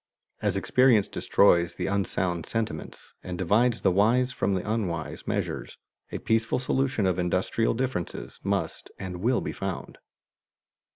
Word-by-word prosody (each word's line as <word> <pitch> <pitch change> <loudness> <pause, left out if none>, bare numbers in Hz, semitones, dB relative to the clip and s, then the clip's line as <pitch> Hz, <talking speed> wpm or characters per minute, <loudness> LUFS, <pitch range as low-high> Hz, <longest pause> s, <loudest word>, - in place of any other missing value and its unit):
As - - +1
experience 125 -6 +4
destroys 85 -4 +3
the - - -3
unsound 90 -4 -1
sentiments, 115 -1 -4
and 90 -1 -5
divides 110 +7 +2
the 95 - +3
wise 115 +7 +3
from 100 -5 0
the 95 - -3
unwise 90 -9 -3
measures, - - -3 0.3
a - - -3
peaceable 110 +1 +1
solution 130 -4 0
of 95 -1 +1
industrial 90 +6 +1
differences 125 -8 -3
must - - -2
and 95 -2 -5
will 120 +7 +1
be - - -4
found. 95 -3 -5
100 Hz, 135 wpm, -27 LUFS, 90-115 Hz, 0.3 s, experience